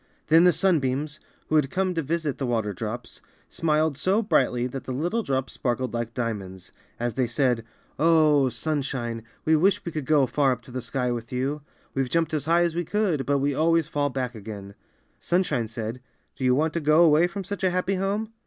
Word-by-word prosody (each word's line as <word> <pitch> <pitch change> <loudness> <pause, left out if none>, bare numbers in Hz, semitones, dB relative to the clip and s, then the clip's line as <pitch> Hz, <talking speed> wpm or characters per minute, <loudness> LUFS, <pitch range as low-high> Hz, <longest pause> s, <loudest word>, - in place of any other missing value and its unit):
Then 165 +3 +6
the 180 - +7
Sunbeams, 150 -4 +1 0.3
who 155 - +2
had 140 -3 +2
come 185 +2 0
to 165 - -1
visit 155 -1 -2
the 135 - -1
water 110 -4 -1
drops, 115 +5 -6 0.3
smiled 155 -2 +1
so 195 +9 +2
brightly 125 - +2
that 130 +1 -6
all 130 - -2
the - - -3
little 180 +9 0
drops 135 - -2
sparkled 125 0 -2
like 115 -1 -3
diamonds, 95 -6 -4 0.3
as 120 0 -1
they 125 +2 0
said, 120 -1 +1 0.4
"Oh! 155 -4 +4
Sunshine, 125 -3 -3 0.2
we 160 - +4
wish 185 +5 +2
we 170 - -3
could 155 -3 -4
go 150 -3 +4
far 135 +1 +2
up 125 0 -9
to - - -13
the 130 +1 -4
sky 125 +1 -2
with 115 -1 -5
you. 135 +4 -2 0.3
WeVe 135 -2 0
jumped 165 +1 0
as 150 -2 -1
high 170 +2 +4
as 170 -2 0
we 175 +1 -1
could, 175 -6 0
but 140 0 +3
we 140 +1 0
always 165 +1 +2
fall 145 -2 0
back 125 -2 -3
again.'' 100 -2 -8 0.5
Sunshine 155 -10 0
said: 115 +2 -5 0.3
"Do - - -6
you 125 0 +4
want 155 +3 +1
to 170 - 0
go 155 +2 +5
away 160 +1 +5
from 195 +2 -6
such 200 0 -6
a 185 - +4
happy 180 +2 0
home? 200 +3 -1
145 Hz, 210 wpm, -25 LUFS, 125-165 Hz, 0.5 s, the